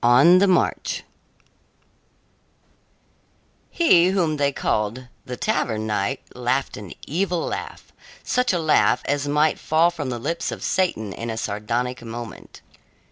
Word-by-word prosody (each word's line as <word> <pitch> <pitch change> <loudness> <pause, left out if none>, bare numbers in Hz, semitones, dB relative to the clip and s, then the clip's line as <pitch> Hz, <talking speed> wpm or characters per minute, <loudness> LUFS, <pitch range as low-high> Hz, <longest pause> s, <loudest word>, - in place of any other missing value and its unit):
ON 135 +10 +7
THE 200 - +4
MARCH 185 -2 +1 2.7
He 180 - +4
whom 175 -5 +1
they 140 -1 +2
called 115 0 -2 0.2
the 125 -1 -6
Tavern 110 -2 -1
Knight 105 +4 -1
laughed 125 +2 -1
an 100 -3 -8
evil 175 +1 -1
laugh - - -6 0.3
such 250 0 +1
a 180 - +1
laugh 155 -2 +3
as 145 0 -1
might 150 +2 +2
fall 165 +2 +3
from 150 -6 -5
the 120 - -3
lips 170 +8 -3
of - - -7
Satan 110 - 0
in 115 +3 -6
a 110 - -3
sardonic 115 +4 -2
moment. 115 -1 -9
140 Hz, 135 wpm, -23 LUFS, 115-170 Hz, 2.7 s, ON